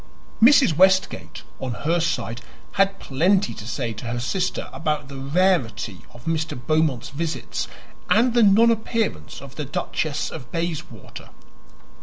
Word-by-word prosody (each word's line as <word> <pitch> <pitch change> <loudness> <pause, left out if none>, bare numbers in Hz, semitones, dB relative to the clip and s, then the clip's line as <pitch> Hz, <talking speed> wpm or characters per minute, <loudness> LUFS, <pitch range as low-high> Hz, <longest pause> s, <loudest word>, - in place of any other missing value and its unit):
Mrs. 255 - +6
Westgate, 180 - +2 0.2
on 130 -2 -3
her 170 +2 +2
side, 120 -8 -2 0.3
had 195 0 +2
plenty 185 +9 +1
to 105 - -9
say 120 -1 -3
to 110 +2 -8
her 120 0 -2
sister 180 +9 -1
about 150 -4 -2
the 135 -1 -7
rarity 140 - +1
of 120 0 -15
Mr. 160 -4 -2
Beaumont's 155 -2 0
visits 160 +3 -3 0.4
and 230 +3 +4
the 240 - +4
nonappearance 220 - +2
of 135 -1 -12
the 150 - -3
Duchess 150 +2 -2
of 125 -6 -9
Bayswater. 160 - -5
155 Hz, 135 wpm, -23 LUFS, 125-190 Hz, 0.4 s, Mrs